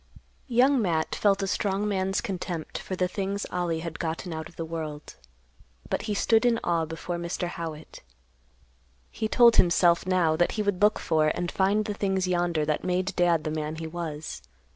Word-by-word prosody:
Young 255 +2 +4
Matt 165 -5 0
felt 200 -1 +2
a - - -1
strong 200 +1 0
man's 195 -1 0
contempt 180 -6 -4
for 190 - -5
the 180 0 +1
things 200 +2 -3
Ollie 170 -2 -1
had 165 -1 -6
gotten 165 +1 -3
out 160 0 -6
of 170 - -20
the 165 - -4
world, 155 -2 -6 0.8
but - - 0
he 205 - 0
stood 225 +3 +3
in 235 -2 +3
awe 165 -1 +1
before 165 +2 -5
Mr. 170 +1 -3
Howitt. 160 -3 -7 1.1
He 220 - -2
told 235 +1 +6
himself, 170 0 +4
now, 175 -4 +2
that 175 +2 +1
he 215 - -1
would 205 -2 -1
look 210 +1 +5
for 155 -2 +1
and 175 +2 -1
find 200 +3 +2
the 210 - -2
things 190 -2 0
yonder 175 -3 +1
that 150 0 -1
made 185 +1 -1
Dad 170 -3 +3
the 155 - -2
man 155 0 -3
he 160 0 -6
was. 160 - -5
175 Hz, 185 wpm, -27 LUFS, 160-200 Hz, 1.1 s, told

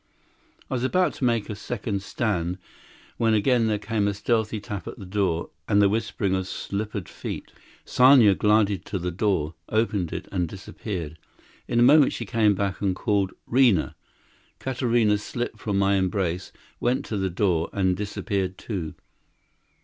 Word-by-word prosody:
I - - -5
was 125 -1 -1
about 180 +7 +2
to - - -6
make 115 -3 +1
a 105 - -5
second 100 -1 -3
stand, 90 -4 -2 0.6
when 115 -1 +3
again 115 +2 +3
there 105 -1 +1
came 105 -1 -1
a 100 - -1
stealthy 110 +1 0
tap 100 -3 -6
at - - -7
the 95 - -9
door, 90 -3 -1 0.2
and 105 -2 +3
the 100 -1 +5
whispering 105 -2 -1
of 95 -1 -1
slippered 100 -1 -4
feet. - - -7 0.3
Sanya 125 -5 +6
glided 105 -2 +2
to 100 - -3
the 90 0 -3
door, 90 -4 0 0.2
opened 105 -6 0
it, - - -5
and 90 -3 0
disappeared. 90 -4 -6 0.5
In 120 - +1
a - - +6
moment 145 +3 +6
she 115 - -4
came 105 -1 +2
back, 95 0 -2
and 95 -3 +1
called, 100 -2 0
"'Rina!" 120 - +3 0.6
Katarina 120 -5 +1
slipped 120 +1 -4
from 100 -2 -1
my 100 0 +3
embrace, 95 -2 -1 0.3
went 125 +2 0
to 110 - -4
the 95 -1 0
door, 90 -3 +1
and 95 -2 +1
disappeared 100 -1 -3
too. 90 -9 -5
100 Hz, 165 wpm, -25 LUFS, 95-115 Hz, 0.6 s, Sanya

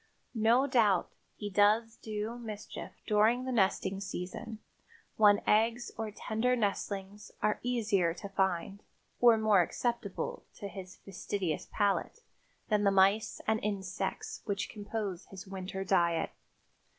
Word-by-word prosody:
No 230 +3 +4
doubt 225 -8 +3 0.2
he 210 - -5
does 215 +3 +3
do 220 +2 -5
mischief 215 -3 -7
during 220 +4 +3
the 260 - -2
nesting 195 -3 +1
season, 200 +4 -5 0.6
when 205 -1 +5
eggs 230 +3 +2
or 220 -1 -3
tender 220 +4 0
nestlings 200 -2 -3
are 210 - +2
easier 210 -8 +1
to 200 - -7
find 195 0 -1 0.4
or 235 -2 +7
more 215 -3 +5
acceptable 235 +2 -2
to 200 - -6
his 185 -2 -9
fastidious 185 -3 -3
palate 205 - 0 0.4
than 210 -2 +2
the 200 - +5
mice 195 +2 +3
and 220 0 +2
insects 190 -2 -3
which 200 -1 -2
compose 205 -3 -4
his 195 +1 -10
winter 190 0 -5
diet. 170 -3 +2
205 Hz, 125 wpm, -31 LUFS, 195-220 Hz, 0.6 s, or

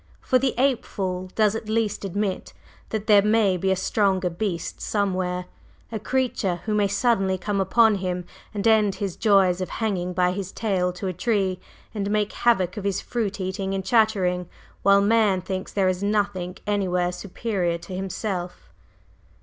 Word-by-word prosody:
For 255 - +2
the 265 0 0
ape 260 -1 +2
fool 185 -1 -4
does 215 -2 +3
at 220 -1 -5
least 220 -2 0
admit 200 0 -3 0.4
that 215 -1 -3
there 205 -2 +6
may 210 -2 +3
be 190 +2 -1
a 190 - +3
stronger 190 -1 +1
beast 175 -1 -3
somewhere, 185 -3 -1 0.5
a 220 - -3
creature 220 -6 -1
who 215 - -1
may 205 -1 +3
suddenly 195 -2 +1
come 195 +2 -1
upon 220 +4 +4
him 180 -1 -3 0.3
and 210 +1 -1
end 215 -3 +4
his 190 -2 -3
joys 190 -4 +3
of 185 - -3
hanging 185 -5 -2
by 180 0 +2
his 190 0 -4
tail 190 -5 0
to 180 +2 -6
a 185 - -1
tree 190 -1 0 0.3
and 200 -2 -2
make 210 0 0
havoc 190 -7 +1
of 205 - -4
his 200 -1 0
fruit 210 -5 -3
eating 190 +1 -2
and 190 -1 -3
chattering, 190 -6 +2 0.3
while 200 0 +5
man 210 -2 +3
thinks 185 +1 -5
there 195 -2 +1
is 185 0 0
nothing 200 -3 -1
anywhere 180 -3 0
superior 180 -2 -2
to 170 +2 -8
himself." 190 -1 -4
195 Hz, 170 wpm, -24 LUFS, 185-215 Hz, 0.5 s, there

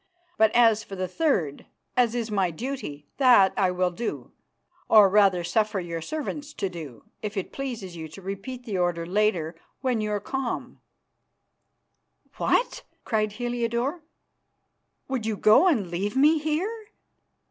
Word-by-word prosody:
But 220 0 +5
as 225 -2 +5
for 195 - -8
the 185 -1 -2
third, 185 - -1 0.3
as 245 -2 +2
is 230 -2 -2
my 195 -3 +1
duty, 170 - -6
that 245 -8 +6
I 190 -2 +2
will 180 0 0
do 230 +7 -5 0.6
or 210 -2 +8
rather 195 -3 +4
suffer 210 +3 0
your 170 -2 -5
servants 295 - -5
to 195 - -2
do 155 -9 -9 0.2
if 210 0 -5
it 195 - -3
pleases 235 -10 -5
you 160 -1 -6
to 155 - -12
repeat 200 +7 -6
the 200 -6 -2
order 175 -1 0
later 180 -4 +1 0.3
when 250 -4 0
you 210 - -2
are 210 0 0
calm." 265 +3 -4 1.6
"What!" - - +1 0.2
cried 215 -2 0
Heliodore, 240 +6 -2 1.1
"would 255 -5 -2
you 215 -2 -1
go 220 - +6
and 215 - +1
leave 200 +7 -2
me 305 +3 +5
here? 370 +9 -2
215 Hz, 145 wpm, -26 LUFS, 185-255 Hz, 1.6 s, or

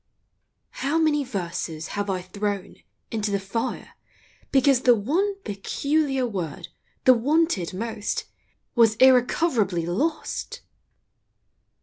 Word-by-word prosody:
How 290 +4 0
many 305 -3 +2
verses 175 - -4
have 205 0 -3
I 185 -2 -2
thrown 200 +1 -4 0.3
Into 215 -2 -1
the 200 0 0
fire 230 +6 -4 0.6
because 270 -1 +4
the 245 -2 +6
one 335 - 0
Peculiar 270 +7 0
word, 180 -10 -5 0.3
the 255 - +8
wanted 270 - +1
most, 215 0 -3 0.5
Was 225 -2 +4
irrecoverably 245 - +3
lost 285 - -2
230 Hz, 100 wpm, -24 LUFS, 195-280 Hz, 0.6 s, the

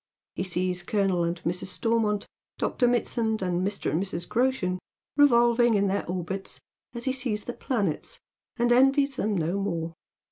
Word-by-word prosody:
He - - -4
sees 180 0 -1
Colonel 190 -2 +1
and 170 +1 -1
Mrs. 175 +3 -1
Stormont, 215 0 0 0.3
Dr. 245 - +1
Mitsand, 230 -3 0
and 180 -1 0
Mr. 200 -5 -1
and 160 +5 +1
Mrs. 175 -3 -4
Groshen 235 -8 0 0.4
revolving 240 -4 +5
in 200 0 +3
their 200 +1 -1
orbits 185 +2 -4 0.4
as 235 - -4
he 260 - +1
sees 240 -5 -2
the 245 - -5
planets, 200 - -2 0.4
and 240 0 +2
envies 270 +2 +4
them 210 -1 0
no 170 +4 0
more. 165 -4 -2
205 Hz, 155 wpm, -27 LUFS, 180-240 Hz, 0.4 s, revolving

